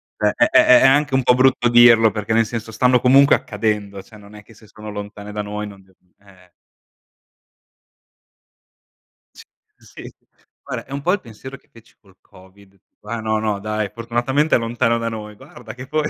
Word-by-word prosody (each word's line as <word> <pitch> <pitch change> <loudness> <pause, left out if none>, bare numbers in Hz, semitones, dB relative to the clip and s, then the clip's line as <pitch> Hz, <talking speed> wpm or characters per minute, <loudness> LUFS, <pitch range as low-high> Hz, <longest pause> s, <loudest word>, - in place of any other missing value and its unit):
È 105 - -1
è - - +2
è - - +4
è 125 -1 +6
è - - +4
anche 145 +1 +2
un 130 -1 +1
po' 125 - +4
brutto 130 -1 +2
dirlo 120 -2 +5
perché, 105 0 -6
nel 115 0 +2
senso, 110 0 -7
stanno 125 +2 +1
comunque 135 +2 +5
accadendo, 105 -2 -4
cioè, 110 +3 -18
non 105 0 -17
è 105 - -13
che 115 - -19
se 110 +1 -20
sono 105 +1 -12
lontane 105 0 -9
da 105 - -4
noi 105 +1 -6
non, 100 -1 -14 0.4
eh 95 -3 -22 2.8
Sì, - - -15 0.3
sì. - - -14 0.5
Guarda - - -7
è - - -19
un 140 +1 -5
po' 175 - 0
il 205 - -2
pensiero 130 +3 -12
che - - -34
feci 115 -1 -21
col 95 -3 -25
COVID. 95 +1 -21 0.2
Qua: 110 +2 -7
"No 110 0 -1
no 105 -2 -2
dai, 105 0 -4
fortunatamente 120 +7 -1
è - - +4
lontano 115 0 -1
da 115 0 -3
noi" 105 -1 -9
guarda 110 +2 -13
che 130 +1 -11
poi 155 +1 -2
110 Hz, 190 wpm, -19 LUFS, 105-125 Hz, 2.8 s, è